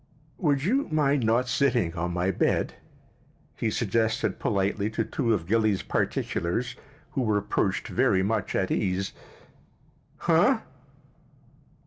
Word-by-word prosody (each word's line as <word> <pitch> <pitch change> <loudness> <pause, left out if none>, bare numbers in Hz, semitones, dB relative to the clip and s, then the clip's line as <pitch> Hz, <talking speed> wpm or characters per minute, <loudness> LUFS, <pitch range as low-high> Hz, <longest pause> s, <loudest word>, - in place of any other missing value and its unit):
"Would 145 -4 +1
you 260 - +1
mind 145 -4 +2
not 115 +3 +2
sitting 120 -9 +1
on 85 0 -2
my 90 +2 0
bed?" - - 0 0.8
he - - -1
suggested 115 -1 0
politely 100 +1 0
to 110 +1 -1
two 120 -5 -1
of 90 -7 0
Gilly's 110 0 +1
particulars 105 +10 -1 0.4
who 135 - -1
were 110 -4 +2
perched 100 -1 -1
very 95 - +2
much 105 +1 -1
at 95 - 0
ease. 95 -1 -1 1.0
"Huh?" - - +3
110 Hz, 120 wpm, -27 LUFS, 95-125 Hz, 1.0 s, Huh